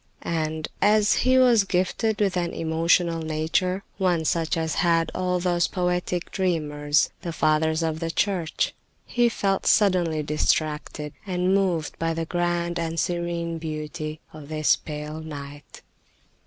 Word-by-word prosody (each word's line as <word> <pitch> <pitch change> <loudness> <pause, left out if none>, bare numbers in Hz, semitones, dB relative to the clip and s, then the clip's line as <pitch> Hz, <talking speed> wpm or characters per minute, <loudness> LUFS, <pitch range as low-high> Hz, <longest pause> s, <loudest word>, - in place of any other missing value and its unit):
And, 160 -1 -2
as 210 0 +4
he 255 0 +3
was 245 -5 +5
gifted 195 +4 0
with 195 -3 +2
an 175 -1 -1
emotional 165 +1 +2
nature, 160 +5 -1 0.2
one 175 -4 +1
such 165 +1 0
as 160 -1 -1
had 165 -2 +2
all 180 -1 0
those 175 -1 +1
poetic 180 -1 -2
dreamers, 150 -6 +1
the 170 - -4
Fathers 160 0 +1
of 160 -1 -1
the 165 0 -2
Church, 175 -2 0 0.3
he 240 -1 +2
felt 195 -4 -1
suddenly 175 -7 +3
distracted 150 0 -1
and 180 0 +1
moved 180 -6 0
by 165 - 0
all 165 - 0
the 165 0 -2
grand 175 0 -1
and 165 0 -2
serene 170 -1 -2
beauty 155 0 -5
of 155 -2 -11
this 155 -1 +3
pale 150 0 -6
night. 145 -2 -9
165 Hz, 140 wpm, -25 LUFS, 155-180 Hz, 0.3 s, was